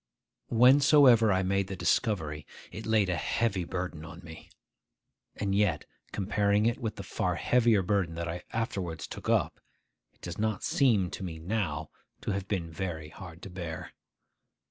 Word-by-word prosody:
Whensoever 125 Hz, -2 st, +6 dB
I 95 Hz, 0 st, +2 dB
made 100 Hz, +1 st, 0 dB
the 95 Hz, -, -5 dB
discovery, 80 Hz, -7 st, 0 dB, 0.2 s
it 110 Hz, -, -7 dB
laid 110 Hz, -3 st, +3 dB
a 90 Hz, -, 0 dB
heavy 95 Hz, +3 st, 0 dB
burden 90 Hz, -3 st, -4 dB
on 85 Hz, +1 st, -10 dB
me. 80 Hz, -1 st, -11 dB, 0.9 s
And 100 Hz, -1 st, -1 dB
yet, 95 Hz, -7 st, +1 dB, 0.3 s
comparing 105 Hz, +1 st, +1 dB
it 120 Hz, +3 st, +1 dB
with 110 Hz, -4 st, -3 dB
the -, -, -7 dB
far -, -, -1 dB
heavier 115 Hz, -5 st, +3 dB
burden 90 Hz, -3 st, 0 dB
that 85 Hz, 0 st, -3 dB
I 85 Hz, +2 st, -4 dB
afterwards 95 Hz, -8 st, -3 dB
took -, -, -7 dB
up, -, -, +1 dB, 0.5 s
it -, -, -36 dB
does 85 Hz, +1 st, -6 dB
not 110 Hz, -2 st, -1 dB
seem 110 Hz, -10 st, +2 dB
to -, -, -6 dB
me 85 Hz, -3 st, -5 dB
now 85 Hz, -2 st, -2 dB, 0.3 s
to -, -, -2 dB
have 100 Hz, -1 st, -3 dB
been 85 Hz, -6 st, -2 dB
very 80 Hz, -3 st, -4 dB
hard 85 Hz, 0 st, -11 dB
to 95 Hz, -, -8 dB
bear. 85 Hz, -1 st, -6 dB
95 Hz, 165 wpm, -29 LUFS, 85-110 Hz, 0.9 s, Whensoever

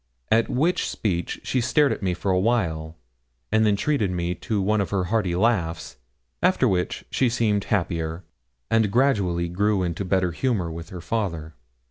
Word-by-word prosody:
At 115 Hz, +1 st, +3 dB
which 160 Hz, +8 st, +1 dB
speech 90 Hz, -5 st, -2 dB
she 130 Hz, -, 0 dB
stared 145 Hz, +4 st, +3 dB
at -, -, -3 dB
me 90 Hz, -2 st, 0 dB
for 95 Hz, +2 st, -1 dB
a 90 Hz, -, +3 dB
while, 85 Hz, -8 st, 0 dB, 0.6 s
and 110 Hz, 0 st, +4 dB
then 105 Hz, -, +3 dB
treated 110 Hz, -1 st, 0 dB
me 90 Hz, -1 st, -1 dB
to 105 Hz, +4 st, -3 dB
one 105 Hz, +2 st, +2 dB
of 100 Hz, -, -2 dB
her 95 Hz, -2 st, 0 dB
hearty 95 Hz, -2 st, 0 dB
laughs, 85 Hz, -, 0 dB, 0.4 s
after 180 Hz, -8 st, +3 dB
which 90 Hz, -4 st, -1 dB
she 130 Hz, -, +2 dB
seemed 110 Hz, -4 st, +1 dB
happier, 85 Hz, -3 st, -1 dB, 0.5 s
and 110 Hz, -2 st, +3 dB
gradually 100 Hz, -9 st, +2 dB
grew 100 Hz, +2 st, +1 dB
into 85 Hz, +2 st, -2 dB
better 95 Hz, -1 st, +1 dB
humour 95 Hz, -3 st, -1 dB
with 85 Hz, +1 st, -8 dB
her 90 Hz, -2 st, -8 dB
father. 85 Hz, -6 st, -3 dB
95 Hz, 170 wpm, -24 LUFS, 85-115 Hz, 0.6 s, and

